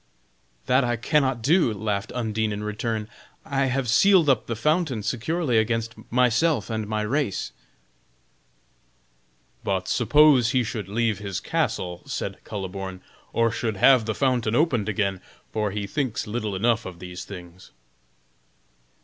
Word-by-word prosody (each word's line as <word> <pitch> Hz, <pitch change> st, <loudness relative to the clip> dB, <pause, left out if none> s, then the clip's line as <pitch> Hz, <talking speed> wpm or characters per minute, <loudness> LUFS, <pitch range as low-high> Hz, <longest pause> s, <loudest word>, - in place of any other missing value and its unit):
"That 130 Hz, +1 st, +3 dB
I 120 Hz, -1 st, 0 dB
cannot 130 Hz, 0 st, +1 dB
do," 160 Hz, -2 st, +4 dB
laughed 100 Hz, -1 st, -3 dB
Undine 110 Hz, -3 st, -1 dB
in 105 Hz, 0 st, -4 dB
return; 105 Hz, 0 st, -3 dB, 0.4 s
"I 135 Hz, 0 st, 0 dB
have 130 Hz, 0 st, -1 dB
sealed 175 Hz, -, +5 dB
up 130 Hz, -5 st, +2 dB
the 115 Hz, -, -2 dB
fountain 150 Hz, -, 0 dB
securely 125 Hz, -, 0 dB
against 115 Hz, 0 st, -1 dB, 0.2 s
myself 125 Hz, -, +2 dB
and 110 Hz, -1 st, -2 dB
my 105 Hz, 0 st, -1 dB
race." 125 Hz, -2 st, -1 dB, 2.1 s
"But 95 Hz, -2 st, -1 dB
suppose 130 Hz, 0 st, +5 dB
he 130 Hz, -1 st, +3 dB
should 110 Hz, -4 st, -5 dB
leave 110 Hz, 0 st, 0 dB
his 100 Hz, -3 st, -4 dB
castle," 90 Hz, -1 st, -2 dB
said -, -, -4 dB
Kuhleborn, 95 Hz, -1 st, -6 dB, 0.3 s
"or 115 Hz, 0 st, +2 dB
should 110 Hz, -2 st, -2 dB
have 125 Hz, +2 st, +5 dB
the 110 Hz, -1 st, -2 dB
fountain 125 Hz, -5 st, +1 dB
opened 125 Hz, -9 st, +2 dB
again! 100 Hz, -2 st, -1 dB, 0.3 s
for 105 Hz, -1 st, -1 dB
he 100 Hz, +1 st, -3 dB
thinks 130 Hz, +2 st, -2 dB
little 105 Hz, -2 st, -3 dB
enough 115 Hz, +2 st, +1 dB
of 90 Hz, -2 st, -9 dB
these 90 Hz, 0 st, -8 dB
things." 90 Hz, -2 st, -11 dB
110 Hz, 140 wpm, -25 LUFS, 105-130 Hz, 2.1 s, sealed